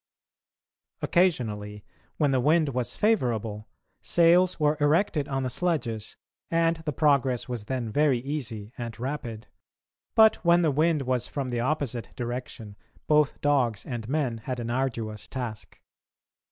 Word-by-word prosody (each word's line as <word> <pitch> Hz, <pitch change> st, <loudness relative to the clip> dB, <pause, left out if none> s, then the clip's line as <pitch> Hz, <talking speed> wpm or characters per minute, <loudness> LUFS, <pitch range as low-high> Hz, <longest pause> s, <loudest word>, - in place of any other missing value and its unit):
Occasionally, 105 Hz, -, 0 dB, 0.3 s
when 145 Hz, -3 st, +2 dB
the 130 Hz, -, +2 dB
wind 155 Hz, +3 st, +3 dB
was 125 Hz, -2 st, -2 dB
favourable, 115 Hz, -, 0 dB, 0.3 s
sails 175 Hz, +2 st, +4 dB
were 150 Hz, 0 st, +3 dB
erected 150 Hz, 0 st, +2 dB
on 135 Hz, -1 st, -2 dB
the 130 Hz, -, -1 dB
sledges 120 Hz, -10 st, -2 dB, 0.3 s
and 165 Hz, 0 st, +2 dB
the 160 Hz, -1 st, -4 dB
progress 135 Hz, -4 st, +2 dB
was 120 Hz, -4 st, -5 dB
then 120 Hz, -2 st, -3 dB
very 145 Hz, 0 st, +3 dB
easy 120 Hz, -5 st, -5 dB
and 115 Hz, -1 st, -6 dB
rapid; 120 Hz, -4 st, -5 dB, 0.7 s
but 220 Hz, -1 st, +6 dB
when 170 Hz, 0 st, +3 dB
the 155 Hz, -, +3 dB
wind 155 Hz, +1 st, +2 dB
was 125 Hz, -2 st, -1 dB
from 135 Hz, -3 st, -4 dB
the 120 Hz, -, -1 dB
opposite 130 Hz, -3 st, -2 dB
direction 120 Hz, -3 st, -6 dB, 0.3 s
both 150 Hz, -1 st, +2 dB
dogs 130 Hz, -7 st, +1 dB
and 120 Hz, -3 st, -5 dB
men 135 Hz, -6 st, -1 dB
had 125 Hz, +2 st, -5 dB
an 120 Hz, 0 st, -3 dB
arduous 115 Hz, -4 st, -2 dB
task. 120 Hz, -5 st, -6 dB
130 Hz, 140 wpm, -27 LUFS, 115-150 Hz, 0.7 s, but